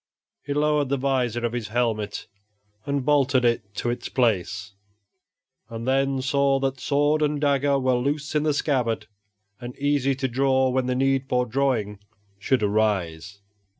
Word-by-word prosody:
He 145 0 -4
lowered 150 -2 +1
the 140 - +1
vizor 125 -3 0
of 120 - -2
his 120 -3 -3
helmet 110 -3 -2 0.6
and 140 -2 -1
bolted 135 -3 +3
it 105 -4 0
to 120 - -1
its 120 0 -5
place, 105 -4 0 1.0
and 115 +1 -6
then 135 0 +1
saw 140 0 +2
that 135 -1 -2
sword 145 +2 +1
and 150 -1 +1
dagger 140 -1 +2
were 130 -1 +1
loose 140 +3 -2
in 150 - +2
the 150 -1 +1
scabbard 125 -8 0 0.5
and 120 0 -8
easy 140 -1 +1
to 130 0 -2
draw 130 +1 +2
when 130 0 0
the 125 - 0
need 135 0 +1
for 125 0 +1
drawing 120 -5 -1 0.4
should 125 +2 +1
arise. 100 -3 -1
130 Hz, 155 wpm, -24 LUFS, 115-140 Hz, 1.0 s, bolted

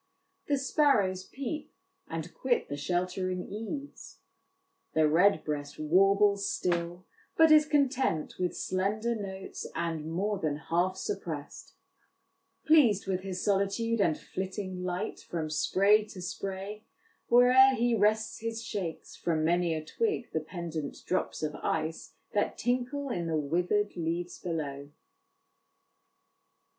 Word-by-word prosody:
"The 285 - +2
sparrows 220 -10 +2
peep, 280 +3 -6 0.3
and 165 +1 -5
quit 255 -2 0
the 145 - -3
sheltering 180 +3 -2
eaves." 225 +8 -7 0.4
" 375 0 -47
The 155 -1 +5
redbreast 155 -4 +2
warbles 195 +5 +3
still, 175 +1 -2 0.3
but 320 -1 +7
is 305 -1 +7
content 270 - +1
With 180 -1 -1
slender 205 +5 0
notes, 195 -3 -6
and 160 -2 -2
more 200 +4 -1
than 155 -4 -1
half 175 +4 0
suppress'd; 155 -8 -5 0.9
Pleased 270 -11 +5
with 190 -1 -1
his 185 -1 -4
solitude, 205 +3 +1
and 160 -5 +2
flitting 190 -1 -5
light 180 +4 -3
From 160 -3 -4
spray 195 +7 +4
to 205 -3 -11
spray, 195 +3 -5 0.4
where'er 255 +2 +7
he 240 0 +2
rests 215 0 +2
he 230 0 -3
shakes 205 -7 -5
From 160 -2 0
many 170 0 +2
a 155 0 -5
twig 415 - -1
the 160 - +1
pendent 160 -3 -5
drops 185 - -1
of 150 -1 -1
ice 160 +1 -3 0.2
That 205 - 0
tinkle 250 +4 -1
in 175 -8 -2
the 160 -1 0
wither'd 180 +8 0
leaves 170 +1 -3
below." 145 -5 -4
190 Hz, 125 wpm, -30 LUFS, 170-230 Hz, 0.9 s, but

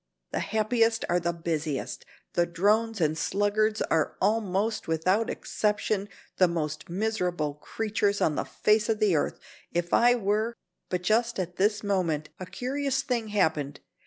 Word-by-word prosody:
The - - -1
happiest 225 +1 +1
are 175 - +3
the 170 0 0
busiest; 160 -4 -3 0.3
the 175 0 +2
drones 210 +6 +1
and 155 -2 +2
sluggards 205 +5 +1
are 160 -2 0
almost, 215 0 0
without 185 +7 +1
exception, 210 -1 -1 0.3
the 185 - +6
most 155 -3 -3
miserable 180 -6 -1
creatures 205 +5 -1
on 155 - +2
the - - -1
face 215 +1 +1
of 220 - +2
the 210 -5 +3
earth. 145 - 0 0.4
If 175 0 -1
I 245 +1 +6
were 215 +1 0 0.2
" - - -54
But 180 -1 -2
just 230 +5 +2
at 180 -1 -4
this 210 +2 +2
moment 175 -7 0
a 185 - -6
curious 270 +5 -1
thing 240 -5 -1
happened. 160 -9 0
200 Hz, 155 wpm, -27 LUFS, 170-220 Hz, 0.4 s, the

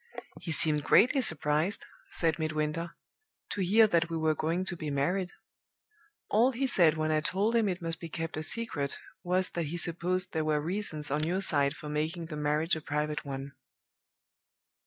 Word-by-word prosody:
"'He 165 - -5
seemed 150 -2 +3
greatly 255 - +4
surprised,' 160 - +3 0.2
said 165 -1 0
Midwinter, 155 +2 -2 0.6
'to 205 - -2
hear 210 +5 +5
that 170 -5 +1
we 165 - -2
were 160 -1 +2
going 165 +4 -1
to 180 - -4
be 155 -3 -5
married. 175 +7 0 1.0
All 240 +5 +3
he 265 +3 -1
said 170 -10 +4
when 155 0 0
I 155 0 +2
told 200 +8 0
him 225 -3 +3
it 180 -1 -4
must 165 -1 -2
be 165 - -7
kept 165 0 -4
a 155 - -3
secret 155 -7 -2 0.3
was 185 +1 0
that 170 -3 -3
he 170 +4 -4
supposed 175 +2 0
there 160 -1 0
were 155 -1 +1
reasons 155 -3 -2
on 150 +1 0
your 185 +3 0
side 145 -6 +1
for 150 - -9
making 155 +3 -2
the - - -3
marriage 150 +3 +1
a 160 - -6
private 150 0 -2
one. 135 0 -6
165 Hz, 180 wpm, -30 LUFS, 150-185 Hz, 1.0 s, hear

